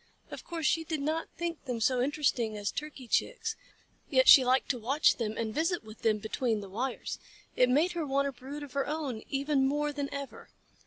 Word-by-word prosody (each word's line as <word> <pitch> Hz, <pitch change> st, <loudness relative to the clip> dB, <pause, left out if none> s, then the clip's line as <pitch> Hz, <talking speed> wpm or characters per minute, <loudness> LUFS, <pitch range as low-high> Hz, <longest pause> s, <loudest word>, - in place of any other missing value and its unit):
Of -, -, -7 dB
course 330 Hz, -3 st, -5 dB
she 325 Hz, +2 st, +2 dB
did 315 Hz, -1 st, -3 dB
not 315 Hz, +2 st, -1 dB
think 340 Hz, -2 st, -4 dB
them 250 Hz, -3 st, -3 dB
so 245 Hz, +2 st, +2 dB
interesting 255 Hz, -6 st, 0 dB
as 205 Hz, -1 st, -2 dB
Turkey 290 Hz, -4 st, -6 dB
Chicks, 450 Hz, -, 0 dB, 0.5 s
yet -, -, +4 dB
she 265 Hz, -, +10 dB
liked 255 Hz, +1 st, +2 dB
to 250 Hz, -, 0 dB
watch 270 Hz, +7 st, +3 dB
them 220 Hz, -2 st, -3 dB
and 220 Hz, -1 st, -2 dB
visit 330 Hz, -, 0 dB
with 215 Hz, 0 st, -13 dB
them 220 Hz, -2 st, +2 dB
between 220 Hz, +1 st, -1 dB
the 200 Hz, -1 st, -8 dB
wires. 245 Hz, +6 st, -4 dB, 0.4 s
It 250 Hz, 0 st, +4 dB
made 305 Hz, +8 st, +3 dB
her 340 Hz, -2 st, -2 dB
want 280 Hz, +1 st, +1 dB
a -, -, -2 dB
brood 275 Hz, +3 st, -8 dB
of 280 Hz, -3 st, -10 dB
her 275 Hz, 0 st, 0 dB
own 290 Hz, -7 st, -3 dB
even 275 Hz, -1 st, +1 dB
more 295 Hz, +1 st, 0 dB
than 285 Hz, -1 st, -3 dB
ever. 280 Hz, -2 st, -7 dB
275 Hz, 210 wpm, -30 LUFS, 245-300 Hz, 0.5 s, she